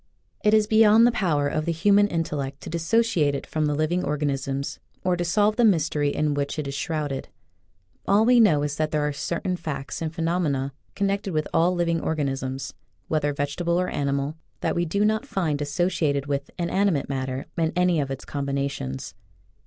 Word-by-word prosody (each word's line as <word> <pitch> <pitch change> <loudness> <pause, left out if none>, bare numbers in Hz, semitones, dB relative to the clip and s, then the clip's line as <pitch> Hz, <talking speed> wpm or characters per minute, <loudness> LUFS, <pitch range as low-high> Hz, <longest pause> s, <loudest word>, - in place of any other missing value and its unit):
It 210 +1 +5
is 215 -1 +4
beyond 220 +1 +6
the 240 - +5
power 160 -10 +1
of 155 +2 -1
the 170 - 0
human 205 +5 +4
intellect 145 -6 -3
to - - -7
dissociate 170 -3 +2
it - - -5
from 155 -1 -1
the 150 - 0
living 160 +4 0
organisms, 140 -2 -2 0.2
or 180 -1 +2
to 175 - -2
solve 205 +5 +2
the 240 - +4
mystery 155 -8 +2
in 150 +1 0
which 145 +1 -2
it 150 -2 -3
is 140 - -4
shrouded. 145 -2 -3 0.8
All 205 +3 +4
we 245 0 +6
know 160 -10 +5
is 145 0 -2
that 155 -1 0
there 150 -1 0
are 150 - -2
certain 175 +5 -2
facts 150 -4 -5
and 160 -1 -2
phenomena 160 -5 -1 0.2
connected 200 -1 -1
with 155 -1 0
all 175 +2 +3
living 170 -2 0
organisms, 135 -3 -2 0.4
whether 150 -2 +1
vegetable 145 +5 -1
or 180 - 0
animal, 140 +1 -1 0.3
that - - 0
we 175 - +1
do 200 +6 +1
not 220 +5 0
find 160 - -1
associated 145 -2 0
with 140 0 -2
inanimate 175 -3 +1
mat 130 -1 -2
ter 130 +1 -4
in 165 -1 +1
any 180 -2 +3
of 140 -2 -1
its 135 0 -6
combinations. 140 - -3
155 Hz, 185 wpm, -25 LUFS, 140-180 Hz, 0.8 s, beyond